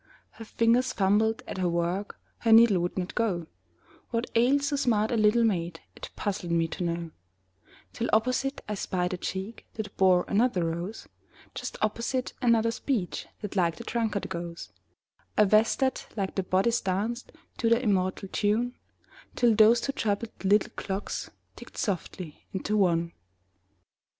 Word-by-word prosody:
Her 225 - -11
fingers 235 +3 +2
fumbled 220 +4 +2
at - - -5
her 180 -1 +1
work, 175 +4 -2 0.2
Her 230 - +1
needle 225 -4 +7
would 175 +2 -2
not 180 0 -3
go; 195 -8 0 0.6
What 230 0 -2
ailed 260 +5 +3
so 285 0 0
smart 230 -6 +1
a - - +1
little 215 +2 +4
maid 170 -6 0 0.2
It - - -8
puzzled 190 -4 -3
me 165 -1 +2
to 180 - -4
know, 170 -1 -3 0.8
Till 235 - -2
opposite 255 +5 +1
I 210 - -2
spied 180 -2 -2
a - - -2
cheek 190 +5 -5
That 215 -2 -6
bore 185 -2 +4
another 205 -5 +2
rose; 170 +6 -4 0.5
Just - - -5
opposite, 235 +4 -1
another 230 -2 +3
speech 230 -6 -2
That 210 -2 -6
like 170 -4 +2
the - - -9
drunkard 225 -4 -1
goes; 170 0 -6 0.7
A 210 - +6
vest 215 +3 +4
that, 265 -1 0
like 195 -2 -1
the 195 - 0
bodice, 190 +6 +1
danced 210 +6 -2 0.3
To 230 - +2
the 230 0 +4
immortal 195 -4 0
tune, 225 +4 +1 0.6
Till 240 -2 +4
those 220 +2 +6
two 275 - -1
troubled 220 -3 -2
little 200 +1 +3
clocks 195 0 -4 0.3
Ticked - - -13
softly 180 -4 -4
into 195 +2 -1
one. 170 -4 +2
210 Hz, 155 wpm, -28 LUFS, 185-230 Hz, 0.8 s, needle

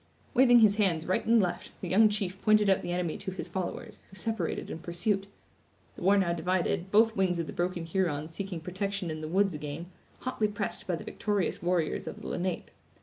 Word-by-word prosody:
Waving 245 -2 +7
his 210 -1 +5
hands 175 -7 +1
right 185 - +1
and 230 0 +6
left, 180 -3 -2
the 185 - -5
young 210 +5 +5
chief 195 -2 -2
pointed 210 -2 +4
out 190 - +2
the 175 - -4
enemy 175 -2 -2
to - - -5
his 185 -2 -5
followers, 180 0 -5
who 190 - -15
separated 195 -2 -2
in - - -5
pursuit. 195 +4 -1 0.7
The - - -11
war 195 +3 +5
now 180 -3 +2
divided, 180 +2 0
both 220 +2 +4
wings 185 -2 +1
of 170 - -1
the - - -7
broken 175 -1 -2
Hurons 165 -3 -1
seeking 190 -2 -5
protection 190 +1 -3
in 155 0 -5
the 155 - -4
woods 195 +3 +2
again, 150 +4 -6 0.3
hotly 245 -4 0
pressed 205 -1 -4
by 180 - +1
the - - -7
victorious 205 -4 -1
warriors 175 -2 0
of - - -6
the - - -8
Lenape. 180 0 -3
185 Hz, 205 wpm, -29 LUFS, 170-205 Hz, 0.7 s, Waving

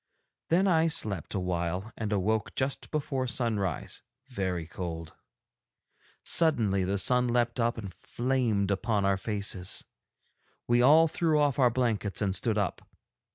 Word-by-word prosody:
Then 185 +4 +3
I 165 -3 +3
slept 105 - 0
awhile 90 +3 -2
and 110 -2 -4
awoke 105 +2 0
just 130 +1 -2
before 135 -4 -2
sunrise, 110 -8 -1 0.3
very 95 -8 -2
cold. 85 -1 -6 1.1
Suddenly 115 - +2
the 95 +2 -1
sun 125 +5 +3
leapt 120 0 0
up 120 0 +1
and 100 -5 -7
flamed 120 -6 -1
upon 100 0 0
our 100 0 +2
faces; 100 -2 -2 0.8
we 120 0 +3
all 155 +6 +6
threw 155 -1 +1
off 145 -3 +1
our 125 -2 +5
blankets 115 -5 -1
and 95 -3 0
stood 105 +3 0
up. 100 -3 -1
110 Hz, 135 wpm, -29 LUFS, 95-130 Hz, 1.1 s, all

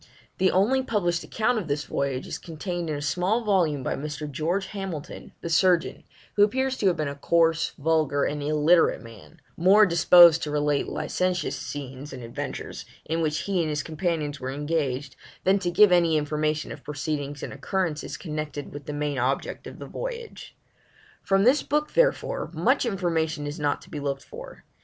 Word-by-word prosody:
The 190 0 +4
only 225 +8 +3
published 175 -9 0
account 225 +1 0
of 185 - -6
this 145 0 -1
voyage 135 -2 -2
is - - -5
contained 170 +1 -5
in 150 - -1
a 145 - -4
small 185 +10 0
volume 170 -10 +1
by - - -1
Mr. 150 +1 -5
George 165 +7 -1
Hamilton, 190 -7 -7
the - - -5
surgeon, 175 +1 +2 0.3
who 205 - +6
appears 260 +5 +1
to 200 - +1
have 180 - +2
been 155 - -1
a 140 - -3
coarse, 165 +2 +2
vulgar, 155 -2 +1
and 145 0 -1
illiterate 155 +3 +3
man, 115 - -14 0.2
more 195 +5 +6
disposed 170 -1 +7
to 150 - -3
relate 145 -1 0
licentious 180 -2 -1
scenes 140 0 -7
and 125 -2 -8
adventures, 115 0 -6 0.2
in 165 +1 -1
which 155 0 0
he 190 -3 0
and 160 - -1
his 150 -1 -2
companions 155 -3 -2
were 130 - -4
engaged, 145 -2 -2 0.3
than 195 +1 +3
to 180 -2 -1
give 195 +3 +6
any 170 -3 +4
information 150 +1 -1
of - - -9
proceedings 145 -1 -4
and - - -5
occurrences 155 +2 -2
connected 150 -3 -5
with 145 -1 -9
the 150 - -4
main 145 -2 -2
object 130 +3 -2
of - - -10
the - - -8
voyage. 475 -2 -7 0.6
From 195 0 +2
this 260 +6 +5
book, 300 +1 -1
therefore, - - +1
much 250 - +2
information 165 -7 -1
is 145 +2 -5
not 145 -1 -1
to - - -17
be 150 - -4
looked 140 -1 -3
for. - - -11
160 Hz, 180 wpm, -26 LUFS, 145-185 Hz, 0.6 s, disposed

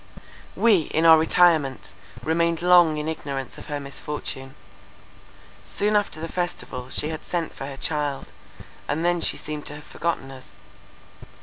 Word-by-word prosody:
We, 200 -9 +3
in 160 +2 +3
our 160 -1 +9
retirement, 160 -5 +3 0.3
remained 170 +2 +1
long 175 -3 +6
in 150 +1 -3
ignorance 140 -4 -4
of - - -11
her 145 -1 -3
misfortune. 140 -1 -6 1.1
Soon 210 +1 0
after 205 -6 0
the 165 - -4
festival 165 -8 -4
she 150 - 0
had 160 0 -5
sent 170 -2 -3
for 135 - -7
her 140 -1 -7
child, 145 -2 -2 0.6
and 160 +4 -1
then 175 -1 +2
she - - 0
seemed 150 -1 -6
to - - -4
have 150 - -10
forgotten 160 -5 -3
us. 130 -1 -13
155 Hz, 150 wpm, -24 LUFS, 140-170 Hz, 1.1 s, our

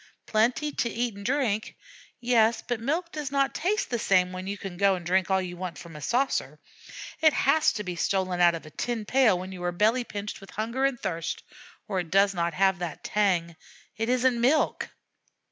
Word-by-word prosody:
Plenty 250 +8 +1
to 235 - -1
eat 235 -2 -2
and 200 - -9
drink 240 -4 -1 0.4
yes, 235 -2 +3
but 245 -2 -1
milk 320 +9 -2
does 295 -3 -4
not 275 -1 +1
taste 390 +2 -1
the 240 - 0
same 185 -3 +3
when 185 +1 -6
you 200 +1 -3
can 195 -3 -7
go 195 +1 +3
and 175 -2 -8
drink 185 +1 +1
all 190 0 +3
you 180 -1 -5
want 180 -1 -5
from 170 -2 -11
a 150 - -8
saucer; 255 - 0 0.6
it 315 -2 +5
has 310 +3 +3
to 210 - -4
be 180 -3 -4
stolen 185 0 0
out 175 -1 +5
of 165 - -8
a 155 - -11
tin 235 +2 -3
pail 250 -5 +4
when 185 +1 -6
you 185 -1 -8
are 175 - 0
belly 220 +8 +2
pinched 205 -3 -6
with 195 - -13
hunger 235 +5 -1
and 270 -3 0
thirst, 165 -3 -3 0.4
or 195 -4 -1
it 175 -2 -4
does 195 +3 +4
not 170 -2 -1
have 190 -1 +3
the 175 -3 -4
tang 180 -5 +1 0.4
it 225 +1 -2
isn't 250 -1 +2
milk. 285 +6 +2
205 Hz, 210 wpm, -27 LUFS, 185-245 Hz, 0.6 s, it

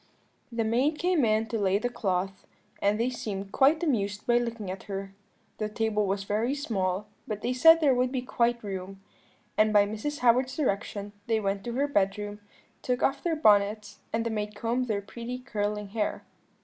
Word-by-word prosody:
"The 230 -1 0
maid 255 +8 +1
came 350 -3 +2
in 220 0 +2
to 225 - -1
lay 195 -1 +2
the 220 - -1
cloth, 190 -5 -2 0.3
and 205 +2 +2
they 245 +2 +1
seemed 200 -5 -5
quite 300 +5 +4
amused 205 - 0
by 240 0 +4
looking 230 -5 -4
at 190 - -8
her. 195 -1 -5 0.5
The 215 -1 -1
table 215 -1 0
was 195 +1 -1
very 220 +7 0
small, 200 -8 -1 0.2
but 210 -2 -4
they 250 - 0
said 325 +6 +7
there 285 -4 +5
would 250 0 +1
be 255 -2 -2
quite 235 -2 0
room; 195 -1 -6 0.6
and 215 0 +5
by 205 -1 +5
Mrs. 220 +8 -4
Howard's 250 +2 +3
direction 205 -6 -2 0.2
they 225 -1 +2
went 195 -1 -2
to 240 - -3
her 280 +4 +1
bedroom, 205 -3 0 0.4
took 250 -1 -1
off 275 +1 +1
their 335 -2 0
bonnets, 210 -5 +3
and 225 0 -1
the 230 - -1
maid 210 -1 -3
combed 240 +4 -1
their 205 -3 -1
pretty 235 +5 -6
curling 210 -5 -3
hair. 210 0 -2
220 Hz, 190 wpm, -28 LUFS, 205-250 Hz, 0.6 s, said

